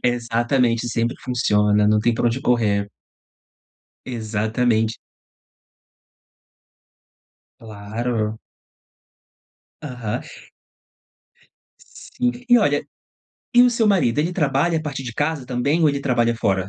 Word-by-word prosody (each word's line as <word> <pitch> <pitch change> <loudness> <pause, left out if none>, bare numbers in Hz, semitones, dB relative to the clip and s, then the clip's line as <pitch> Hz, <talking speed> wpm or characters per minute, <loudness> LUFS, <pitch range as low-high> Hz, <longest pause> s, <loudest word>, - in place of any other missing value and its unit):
Exatamente, 120 0 0
sempre 115 +1 -1
funciona, 105 -4 +2
não 105 0 +3
tem 120 +2 +2
pra 120 - 0
onde 120 +3 0
correr. 105 -5 +1 1.2
Exatamente. 110 0 -1 2.6
Claro. 110 +1 -4 1.4
Aham. 125 -7 -4 1.6
Sim. 125 0 -4 0.2
E, 245 0 +7
olha, 145 -9 +1 0.7
e 245 - +8
o 250 - +5
seu 230 -2 +1
marido, 175 - +2
ele 165 +4 0
trabalha 160 0 +1
a - - -6
partir 140 -3 -5
de 120 - -6
casa 145 -2 -1
também, 135 +6 0
ou 155 - +5
ele 140 -1 -1
trabalha 120 -4 +1
fora? 95 -4 0
120 Hz, 105 wpm, -21 LUFS, 110-140 Hz, 2.6 s, e